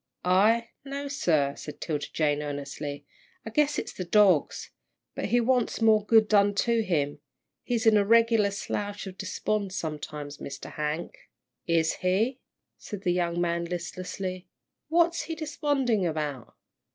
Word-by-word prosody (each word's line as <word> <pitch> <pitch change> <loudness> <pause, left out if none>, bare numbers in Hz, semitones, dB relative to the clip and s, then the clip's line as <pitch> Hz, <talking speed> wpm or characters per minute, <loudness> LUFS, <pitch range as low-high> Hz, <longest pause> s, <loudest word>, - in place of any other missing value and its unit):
"I 215 +6 +3
no, 280 +1 -5
sir," 155 - +1
said 150 - -9
'Tilda 150 -3 -3
Jane, 150 -2 +1
earnestly. 145 0 -5 0.4
"I 220 - -6
guess 295 +4 +2
it's - - -4
the 185 - -4
dogs. 185 -4 +3 0.4
But - - -3
he 245 - +2
wants 245 0 +1
more 220 -2 +4
good 220 0 +5
done 205 -1 +4
to 230 +2 +2
him. 145 -8 -1 0.4
He's 235 -2 -1
in 220 -1 +6
a 205 - +4
regular 230 -1 +4
slouch 205 +1 -4
of 190 -1 -8
despond 195 +1 -2
sometimes, 150 -3 -5
Mr. - - -7
Hank." 150 +3 -3 0.5
"Is 165 -1 +2
he?" 215 +8 +1 0.4
said 205 -2 -8
the 175 -3 +2
young 175 -1 0
man, 170 0 0
listlessly; 185 +1 -5 0.4
"what's 335 +1 +2
he 325 - -4
desponding 285 - 0
about?" 150 -6 -4
195 Hz, 145 wpm, -27 LUFS, 160-230 Hz, 0.5 s, in